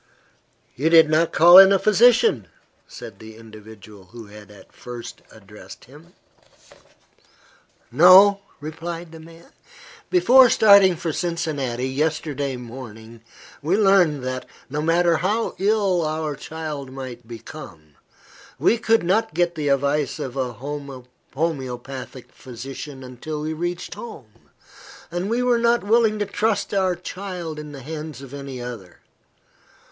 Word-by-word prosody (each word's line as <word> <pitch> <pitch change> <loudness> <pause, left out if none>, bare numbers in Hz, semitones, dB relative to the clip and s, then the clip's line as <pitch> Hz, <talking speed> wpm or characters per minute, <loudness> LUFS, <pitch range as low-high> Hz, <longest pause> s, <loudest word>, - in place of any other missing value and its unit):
"You 150 +6 0
did 160 -2 +6
not 160 +1 +2
call 175 +3 +8
in 195 0 +8
a 195 - +4
physician," 215 - +3 0.4
said 105 -4 -11
the 110 0 -12
individual 110 -2 -14
who 115 +4 -12
had 105 0 -14
at 105 -1 -17
first 120 -1 -10
addressed 105 -1 -14
him. 155 +7 -18 1.8
"No," 185 +8 +7 0.2
replied 165 +3 -7
the 165 - -12
man. 165 +1 -16 0.6
"Before 260 -8 +6
starting 200 -5 +6
for 160 -1 -4
Cincinnati, 145 -8 -3
yesterday 145 -1 -2
morning, 115 -2 -11 0.4
we 165 +7 0
learned 185 -9 +3
that, 130 0 -5 0.2
no 150 +1 -2
matter 165 +1 +2
how 210 +7 -1
ill 195 -3 +1
our 155 -1 -3
child 150 -2 -7
might 130 -3 -9
become, 110 - -11 0.6
we 230 - +2
could 225 -2 +2
not 195 0 0
get 175 0 +1
the 155 -3 -4
advice 140 0 0
of 130 -1 -6
a 130 -2 -3
homoeopathic 135 0 -7
physician 130 +2 -9
until 140 +5 -7
we 155 +1 -3
reached 175 +2 -5
home, 115 - -12 0.6
and 175 +3 -3
we 240 +2 0
were 245 -1 +2
not 235 0 +2
willing 220 +1 +2
to 205 - -1
trust 205 0 -2
our 190 -2 +1
child 180 -3 -7
in 150 -1 -9
the 140 -3 -10
hands 155 -2 -8
of 135 0 -12
any 140 -2 -7
other. 115 -8 -9
155 Hz, 130 wpm, -22 LUFS, 125-180 Hz, 1.8 s, call